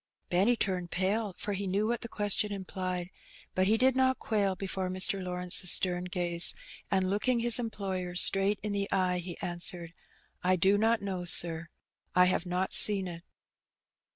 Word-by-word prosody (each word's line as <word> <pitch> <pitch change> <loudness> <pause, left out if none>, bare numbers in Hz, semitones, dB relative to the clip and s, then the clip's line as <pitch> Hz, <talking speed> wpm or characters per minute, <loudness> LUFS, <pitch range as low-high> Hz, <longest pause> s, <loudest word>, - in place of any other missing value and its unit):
Benny 195 +7 +2
turned 185 -5 -3
pale, 195 +2 -2
for 205 - -5
he 195 0 -5
knew 200 +3 -1
what 235 +1 -2
the - - -7
question 205 0 -2
im 195 -2 -7
plied, 185 -1 -5 0.4
but 185 0 0
he 220 +2 +2
did 260 +2 +2
not 260 0 +1
quail 200 -3 -2
before 190 -1 -5
Mr. 185 +1 -1
Lawrence's 180 0 0
stem 180 -1 +2
gaze, 175 -2 0 0.3
and, 190 -1 0
looking 230 +5 -1
his 240 0 +6
employer 190 -6 -5
straight 195 +3 +4
in 210 - -3
the 200 0 -3
eyes, 180 -1 -1
he 175 0 -9
answered 175 -1 -4 0.3
— - - -38
"I 185 +1 +2
do 190 +3 +2
not 225 0 0
know, 190 -3 -5
sir; 165 -1 +3 0.5
I 180 0 +5
have 180 0 -1
not 180 +2 -1
seen 200 -3 +8
it." 170 -1 -9
190 Hz, 180 wpm, -28 LUFS, 180-205 Hz, 0.5 s, seen